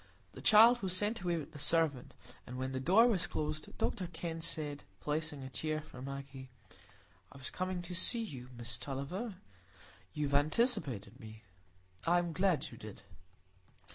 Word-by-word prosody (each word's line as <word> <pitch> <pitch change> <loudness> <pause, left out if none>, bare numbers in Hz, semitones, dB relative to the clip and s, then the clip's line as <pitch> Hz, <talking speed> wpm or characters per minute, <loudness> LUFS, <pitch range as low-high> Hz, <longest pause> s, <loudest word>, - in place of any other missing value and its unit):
The - - -10
child 230 +3 +7
was 185 -2 +2
sent 210 +1 +1
away 175 -2 0
with 155 - -6
the 145 - -10
servant, 150 -3 +2 0.3
and 125 - -6
when 130 +1 -2
the 130 - -2
door 190 - +6
was 215 -8 +2
closed, 155 0 -4
Dr 185 - -1
Kenn 165 -1 -5
said, 150 -3 -3 0.2
placing 150 -2 -2
a 130 - -6
chair 155 +3 -1
for 150 -4 -11
Maggie,— 135 -1 -7 0.8
"I 135 - -12
was 130 - -6
coming 185 -1 -3
to 175 +1 -6
see 230 +6 +4
you, 130 - -8
Miss 120 0 -4
Tulliver; 140 - -4 0.8
you 150 -1 0
have 140 - -4
anticipated 145 - +1
me; 110 0 -11 0.6
I 175 +1 +5
am 175 -1 0
glad 185 -2 +1
you - - -11
did." - - -10
155 Hz, 170 wpm, -34 LUFS, 135-185 Hz, 0.8 s, child